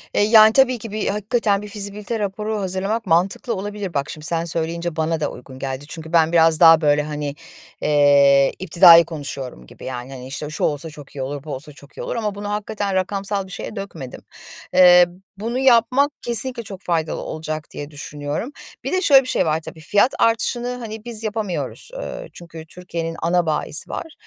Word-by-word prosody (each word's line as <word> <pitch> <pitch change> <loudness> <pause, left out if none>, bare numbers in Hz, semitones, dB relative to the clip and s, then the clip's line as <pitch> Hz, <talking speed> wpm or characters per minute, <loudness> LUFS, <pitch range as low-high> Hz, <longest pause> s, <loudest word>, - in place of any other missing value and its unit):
Eee, - - +3
yani, 215 0 +7
tabii 255 -1 +4
ki 225 -1 -9
bir 215 0 -2
hakikaten 210 0 0
bir 210 - -8
fizibilite 205 +2 -5
raporu 210 +1 -3
hazırlamak 195 +4 -2
mantıklı 185 +7 +1
olabilir. 205 -1 -5
Bak, 140 0 -2
şimdi 155 0 -7
sen 170 0 0
söyleyince 170 0 -2
bana 160 0 -1
da 155 - -2
uygun 130 +1 -12
geldi. 135 +1 -5
Çünkü 160 0 -9
ben 165 -1 +4
biraz 165 -2 +4
daha, 165 -1 +8
böyle, 150 0 +3
hani, 150 -1 -4 0.5
eee, 140 -2 +5
iptidai 170 -2 +7
konuşuyorum 140 - -7
gibi, - - -13
yani, 125 0 -6
hani, 130 -1 -9
işte, 135 +3 -6
"Şu 155 - -5
olsa 150 +2 0
çok 145 -2 -13
iyi 135 - -5
olur, 140 +1 -5
bu 155 - -6
olsa 150 +4 -9
çok 140 0 -18
iyi - - -5
olur." - - -4
ama 210 -3 -2
bunu 205 0 -6
hakikaten 205 -1 -3
rakamsal 195 +1 -2
bir - - -14
şeye 195 - -7
dökmedim. 195 - -8 0.5
Eee, 180 -1 +8 0.3
bunu 230 +4 -3
yapmak 260 +2 +4
kesinlikle 240 +1 -3
çok 195 -3 -10
faydalı 165 -2 -2
olacak 155 -1 -5
diye 145 +1 -7
düşünüyorum. 145 - -5 0.3
Bir - - -3
de 370 - +1
şöyle 275 -7 +6
bir - - -9
şey - - +1
var 155 0 +1
tabii, 160 - -9
fiyat 205 - +2
artışını, 235 +2 +1
hani, 220 -2 -8
biz 230 -2 +3
yapamıyoruz, 215 - -3
ııı, - - -6
çünkü 165 -2 -11
Türkiye'nin 165 -1 -6
ana 175 +1 +1
bayisi 155 -1 -2
var. 325 - -6
175 Hz, 190 wpm, -21 LUFS, 155-210 Hz, 0.5 s, daha